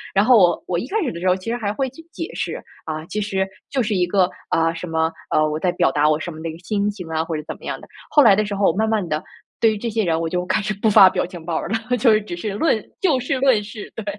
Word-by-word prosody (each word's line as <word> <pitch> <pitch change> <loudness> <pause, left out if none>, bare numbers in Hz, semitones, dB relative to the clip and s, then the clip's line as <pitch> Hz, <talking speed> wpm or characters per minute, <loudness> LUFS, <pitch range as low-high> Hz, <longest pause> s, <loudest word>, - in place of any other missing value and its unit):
然 200 +2 +4
后 250 +1 +6
我 175 -3 +3
我 175 - 0
一 235 - -5
开 440 - 0
始 265 - -1
的 170 - -7
时 185 - -1
候 180 - +4
其 190 +4 -5
实 - - 0
还 210 -4 -2
会 265 +5 -1
去 270 - -13
解 330 - -6
释- - - -3 0.3
啊 155 0 -4
其 210 +5 -3
实， 190 -2 -1 0.2
就 265 -3 0
是 215 -1 -1
一 180 -1 +2
个， 185 -1 +2 0.2
啊 165 0 +2
什 175 +2 -6
么 160 0 0 0.2
呃 155 0 +3
我 155 +1 -2
在 180 +2 +1
表 135 - +2
达 150 +2 +3
我 155 0 +2
什 175 - -5
么 160 -1 -9
的 165 - -3
一 - - -4
个 - - -10
心 200 +3 -1
情 195 -5 -7
啊， 160 0 0
或 160 -1 -3
者 150 - -6
怎 - - -5
么 - - -13
样 - - -4
的。 - - -14 0.2
后 295 -1 +6
来 215 -5 +7
的 215 - +2
时 205 - -3
候， 200 0 +1
我 - - -8
慢 220 +2 +1
慢 215 -5 0
的， 155 -1 -2 0.4
对 225 -1 +4
于 - - -4
这 235 +3 -3
些 220 0 0
人， 165 -2 +1
我 165 0 -2
就 180 +1 -2
开 - - +1
始 215 +1 -2
不 210 +2 +1
发 195 -2 +8
表 - - -1
表 - - -4
情 175 -4 -9
包 170 -1 -2
儿 - - -3
了， 225 +3 -1
就 230 0 +4
是 215 - +3
只 200 -4 -6
是 205 +3 -4
论 220 0 +1 0.2
就 315 -9 +3
事 255 +2 -1
论 255 -6 +3
事， 210 0 -9
对， 225 - -6
200 Hz, 350 characters per minute, -21 LUFS, 170-220 Hz, 0.4 s, 发